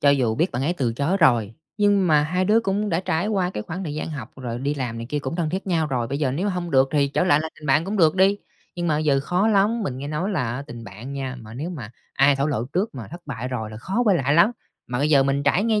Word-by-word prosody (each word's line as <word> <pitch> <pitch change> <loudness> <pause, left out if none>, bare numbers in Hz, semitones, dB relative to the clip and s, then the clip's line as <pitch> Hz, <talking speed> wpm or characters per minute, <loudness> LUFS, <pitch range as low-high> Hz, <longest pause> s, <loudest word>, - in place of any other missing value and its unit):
cho 140 - +5
dù 125 -6 +2
biết 170 +9 +1
bạn 125 - -2
ấy 160 - +1
từ 125 -9 -1
chối 145 +10 0
rồi, 120 - +3 0.2
nhưng 205 -2 +3
mà 150 -2 +4
hai 180 +5 0
đứa 215 +4 +4
cũng 210 -1 -1
đã 165 -2 0
trải 175 0 -1
qua 190 -4 0
cái 105 - -4
khoảng 180 - -6
thời 150 - -4
gian 155 +1 -4
học 140 -8 -7
rồi 120 -2 -5
đi 140 +3 -1
làm 125 -4 -3
này 115 - -6
kia 150 - 0
cũng 140 +4 -4
thân 165 -3 -1
thiết 190 +4 -3
nhau 165 -4 +1
rồi, 125 -4 -1
bây 140 +4 -3
giờ 140 -4 +1
nếu 180 +9 -1
hông 180 -3 -3
được 135 -1 +4
thì 140 -2 +2
trở 165 - 0
lại 155 -5 +4
là 160 - -3
tình 150 - -9
bạn 145 +4 +3
cũng 205 +2 -3
được 160 -3 +4
đ. - - +1 0.5
Nhưng 175 -1 -2
mà 150 -2 +2
bây - - 0
giờ 145 -3 +2
khó 180 +9 +1
lắm, 215 +2 +2
mình 130 -9 -3
nghe 140 - -5
nói 165 +7 -2
là 145 - -1
á 140 - -5
tình 120 -5 -9
bạn 115 +8 -9
nha, 130 -2 -4
mà 110 0 -11
nếu 150 +8 -4
mà 125 -11 -7 0.2
ai 135 +1 +4
thổ 140 +2 0
lộ 125 -6 -1
trước 185 - -2
mà 120 -5 -7
thất 175 +2 -8
bại 125 -3 -4
rồi 110 -4 -4
là 110 - -8
khó 190 - -1
quay 200 -5 +4
lại 140 -1 +1
lắm. 170 +6 +6 0.4
Mà 125 0 -3
bây 145 +3 +1
giờ 140 -3 +6
mình 140 +1 0
trải 180 +9 +2
nghe 220 -2 +2
150 Hz, 310 wpm, -23 LUFS, 130-180 Hz, 0.5 s, lắm